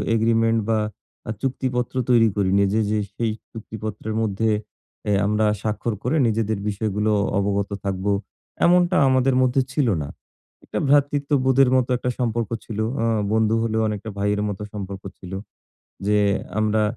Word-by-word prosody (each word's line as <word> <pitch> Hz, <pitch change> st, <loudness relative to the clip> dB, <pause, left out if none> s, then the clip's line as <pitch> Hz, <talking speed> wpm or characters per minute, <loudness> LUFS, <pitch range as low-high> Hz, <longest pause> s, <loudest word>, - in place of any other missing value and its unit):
Agreement 115 Hz, 0 st, +3 dB
বা 110 Hz, -1 st, +3 dB, 0.5 s
আ -, -, 0 dB
চুক্তিপত্র 130 Hz, -2 st, -2 dB
তৈরি 115 Hz, -2 st, +6 dB
করিনি। 100 Hz, -1 st, +2 dB
যে, 110 Hz, -, +2 dB
যে 110 Hz, -, +1 dB, 0.2 s
সেই 115 Hz, -2 st, 0 dB, 0.2 s
চুক্তিপত্রের 110 Hz, -1 st, -6 dB
মধ্যে 110 Hz, +1 st, 0 dB, 0.6 s
অ্যা 105 Hz, -, +1 dB
আমরা 105 Hz, +1 st, +2 dB, 0.2 s
স্বাক্ষর 110 Hz, +2 st, -2 dB
করে 125 Hz, +6 st, 0 dB
নিজেদের 110 Hz, -1 st, 0 dB
বিষয়গুলো 105 Hz, +1 st, -1 dB, 0.3 s
অবগত 100 Hz, 0 st, 0 dB, 0.2 s
থাকবো। 95 Hz, +1 st, -1 dB, 0.5 s
এমনটা 175 Hz, +1 st, +4 dB
আমাদের 130 Hz, 0 st, +3 dB
মধ্যে 130 Hz, +1 st, +3 dB
ছিলো 135 Hz, -6 st, +2 dB
না। 70 Hz, -, -4 dB, 0.6 s
একটা -, -, -3 dB
ভ্রাতৃত্ববোধের 140 Hz, -2 st, +3 dB
মতো 130 Hz, -1 st, +2 dB
একটা 125 Hz, -, -2 dB
সম্পর্ক 115 Hz, -3 st, -1 dB, 0.2 s
ছিলো। 110 Hz, -1 st, -3 dB, 0.2 s
আ -, -, +2 dB, 0.3 s
বন্ধু 110 Hz, 0 st, +3 dB
হলেও 110 Hz, -1 st, 0 dB
অনেকটা 105 Hz, 0 st, -4 dB
ভাইয়ের 105 Hz, +1 st, 0 dB
মতো 100 Hz, 0 st, -5 dB
সম্পর্ক 100 Hz, -1 st, -6 dB, 0.2 s
ছিলো। 95 Hz, +1 st, -6 dB, 0.7 s
যে 105 Hz, 0 st, +3 dB, 0.4 s
আমরা 110 Hz, 0 st, +2 dB
110 Hz, 140 wpm, -23 LUFS, 105-125 Hz, 0.7 s, তৈরি